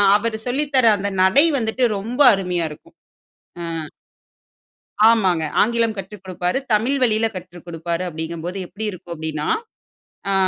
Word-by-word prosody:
அவர் 220 +2 0
சொல்லி 270 +5 0
தர 255 -3 +4
அந்த 200 0 -3 0.2
நடை 275 - +5
வந்துட்டு 225 +3 -1
ரொம்ப 235 +8 -3
அருமையா 180 -3 -1
இருக்கும். 150 - -15 0.7
அ. - - -3 1.4
ஆமாங்க. 185 -8 +2 0.2
ஆங்கிலம் 230 -1 +1
கற்றுக் 195 +1 -8
கொடுப்பாரு. 180 +5 -1
தமிழ் 240 +7 +2
வழில 220 -1 +2
கற்றுக் 175 -1 -10
கொடுப்பாரு 170 +1 -3
அப்படிங்கும்போது 165 +3 -5
எப்படி 215 +4 -6
இருக்கும் 175 -1 -9
அப்படின்னா, 155 -1 -4 0.8
அ - - +1
195 Hz, 130 wpm, -21 LUFS, 170-225 Hz, 1.4 s, நடை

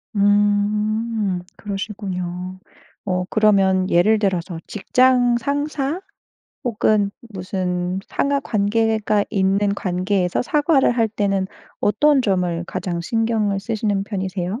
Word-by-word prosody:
음. 205 0 +1 0.2
그러시군요. 185 -3 -5 0.5
어 180 -2 0
그러면 195 -3 +3
예를 210 +6 +4
들어서 180 -4 -1
직장 245 +3 +3
상사? 285 +5 -2 0.6
혹은 215 -3 +2 0.2
무슨 180 -1 -3
상하 280 0 0
관계가 215 -1 +1
있는 200 0 +1
관계에서 185 -1 0
사과를 295 +1 +3
할 225 -1 +2
때는 195 -3 0 0.3
어떤 295 +6 +3
점을 180 -6 0
가장 175 -3 -3
신경을 220 +1 0
쓰시는 205 -2 -1
편이세요? 190 0 -3
205 Hz, 230 characters per minute, -21 LUFS, 185-225 Hz, 0.6 s, 예를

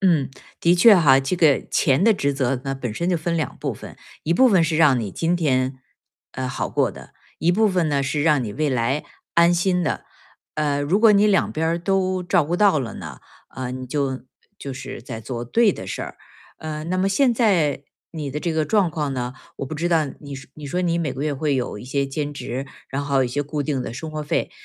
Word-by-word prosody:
嗯， 170 -8 +3 0.3
的 170 +1 +4
确 200 +4 +7
哈， 140 -6 +5
这 135 +7 -2
个 155 -5 +4
钱 135 +5 +2
的 225 +2 +6
职 140 -8 -1
责 135 -1 0
呢， 135 0 -2
本 125 -4 -4
身 170 +11 -2
就 180 - +2
分 170 +1 -2
2 155 -5 -2
部 - - -2
分， - - -11 0.3
一 165 - +1
部 260 +7 +6
分 185 -7 +4
是 160 0 0
让 150 -5 +5
你 105 -5 -4
今 170 - 0
天， 130 -5 0 0.5
呃， 130 0 -3
好 125 - -3
过 - - +1
的。 - - -13 0.3
一 170 +3 +2
部 215 +3 +3
分 180 -4 +1
呢， 140 -2 +1
是 140 +2 -1
让 150 -5 +3
你 105 - -5
未 150 +6 0
来 130 +3 0 0.3
安 170 +1 +5
心 180 +1 +1
的。 155 - -2 0.5
呃， 145 -2 0
如 150 +8 +1
果 225 -1 +7
你 205 +1 +5
两 200 -3 +2
边 160 +1 -1
儿 165 +1 0
都 185 0 0
照 175 -1 +2
顾 165 +4 -2
到 200 -5 +4
了 120 -5 -4
呢， 80 -8 -9 0.3
嗯， 130 0 -5
你 - - -6
就 135 -1 -2 0.4
就 140 - -6
是 130 -1 -7
在 115 -1 -7
做 120 +1 -5
对 225 - +3
的 95 - -8
事 100 - -4
儿。 - - -8 0.4
嗯， 155 0 -5
那 185 - 0
么 190 +1 +2
现 255 +5 +3
在 175 - +2 0.3
你 150 -4 -4
的 145 - -3
这 170 - -1
个 160 -1 +1
状 200 -1 +2
况 150 -3 -2
呢， 125 -1 -3 0.2
我 135 - -4
不 155 - -6
知 165 +3 -2
道 160 -3 +3
你 140 -2 -8
说 135 -1 -11
你 150 -1 -9
说 175 +6 -2
你 170 -2 +1
每 155 -6 -1
个 130 +2 -5
月 150 -1 -1
会 145 +1 0
有 125 -5 -2
一 105 - -9
些 140 +2 -1
兼 145 +2 -3
职， 135 -1 -5 0.2
然 135 +2 -3
后 140 -2 +2
一 - - -2
些 140 +4 -1
固 145 +1 -3
定 140 -3 -2
的 - - -6
生 155 +6 -6
活 155 0 -4
费。 150 - -1
150 Hz, 255 characters per minute, -22 LUFS, 135-175 Hz, 0.5 s, 确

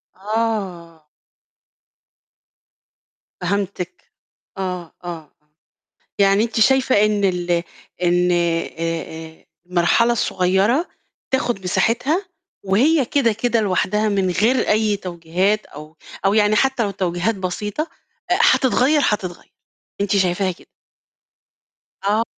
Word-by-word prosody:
آه. 190 -6 -3 2.4
فهمتِك، 185 -1 -3 0.5
آه، 180 -3 -4
آه، 165 -4 -7 0.9
يعني 200 +1 +4
أنتِ 230 0 -2
شايفة 265 +3 +4
إن 210 -1 +1
ال 175 -2 0 0.4
إن 175 +1 +3
آآ، 170 -1 +1
آآ، 165 -1 -5 0.2
المرحلة 180 +7 +3
الصغيرة 200 - +1 0.4
بتاخد 240 -6 -1
مساحتها، 240 - +1 0.4
وهي 265 +10 +3
كده، 235 -3 +2
كده 230 +1 0
لوحدها، 210 +2 +1
من 195 -2 +1
غير 230 +8 +2
أي 210 -1 +2
توجيهات، 180 +3 -1
أو 155 +2 -12 0.3
أو 195 - +4
يعني 210 0 +3
حتّى 265 +1 +2
لو 200 - -1
توجيهات 185 +2 -1
بسيطة، 200 +7 -3 0.5
أ - - +6
هتتغيّر، 265 +3 +4
هتتغيّر، 185 -4 -3 0.5
أنتِ 200 0 +1
شايفاها 185 0 +1
كده؟ 175 - -16 1.3
آه. 210 +3 +2
195 Hz, 100 wpm, -20 LUFS, 175-225 Hz, 2.4 s, أ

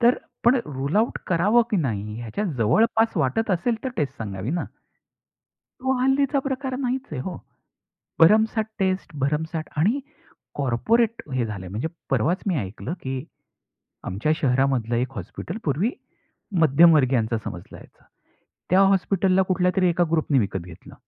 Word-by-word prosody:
तर 240 +1 +4 0.3
पण 240 +3 +6
rule 140 +3 -3
out 225 +3 +1
करावं 205 +7 +3
की 210 - +2
नाही 105 - -2
ह्याच्यात 120 - -3
जवळपास 220 - +2
वाटत 160 - 0
असेल 195 +6 +1
तर - - 0
टेस्ट 140 -3 -2
सांगावी 100 +1 -4
ना. 175 +2 -1 1.0
तो 260 0 -5
हल्लीचा 275 +2 +2
प्रकार 265 -1 -3
नाहीच 260 0 -2
आहे 145 - -4
हो. 180 +5 -5 0.8
भरमसाठ 220 +5 +5
टेस्ट 185 -4 -1
भरमसाठ 155 +3 -1
आणि 215 - +2 0.6
कॉर्पोरेट 220 - +1
हे 125 -2 0
झालंय, 100 -4 -6
म्हणजे 110 - -3 0.2
परवाच 135 - +1
मी 185 - +1
ऐकलं 105 - -5
की 130 0 -4 0.8
आमच्या 105 +12 -1
शहरामधलं 130 -4 +1
एक 125 +2 -1
हॉस्पिटल 100 - -6
पूर्वी 165 - 0 0.7
मध्यमवर्गीयांच 140 -6 +5
समजलं 105 -6 -5
जायचं. - - -18 0.7
त्या 185 - +5
हॉस्पिटलला 190 -1 +3
कुठल्यातरी 180 0 +2
एका 175 +1 +2
ग्रुपनी 155 -4 +2
विकत 100 -3 -1
घेतलं. 90 -2 -13
160 Hz, 135 wpm, -24 LUFS, 125-215 Hz, 1.0 s, पण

